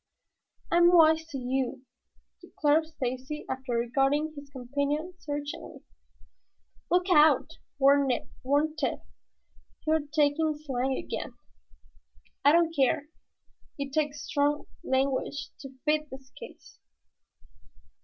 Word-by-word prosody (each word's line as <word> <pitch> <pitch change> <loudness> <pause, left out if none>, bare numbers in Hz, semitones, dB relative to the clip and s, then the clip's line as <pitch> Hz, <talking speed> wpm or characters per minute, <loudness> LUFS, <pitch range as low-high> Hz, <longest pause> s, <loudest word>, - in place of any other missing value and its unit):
'" - - -37
"I'm 345 0 +6
wise 320 -2 +5
to 280 - -5
you," 255 0 -2 0.6
declared 310 +1 +1
Stacy, 260 -1 -5
after 260 -1 -4
regarding 270 +6 +1
his 285 -1 -10
companion 285 +6 -2
searchingly. 290 -1 -6 1.1
"Look 360 +1 +2
out!" 310 -2 +4 0.2
warned 280 0 +4 0.7
Tad. - - -1 0.8
"You 310 - +2
are 320 - +4
talking 300 +1 +1
slang 265 -1 -1
again." - - -5 1.1
"I 285 - +7
don't 330 0 +3
care. 280 +2 +1 0.7
It 280 -1 -5
takes 295 -1 -1
strong 290 0 0 0.2
language 270 0 -1
to 270 - -8 0.2
fit 305 0 +1
this 265 0 -11
case." - - -13
290 Hz, 105 wpm, -28 LUFS, 270-310 Hz, 1.1 s, I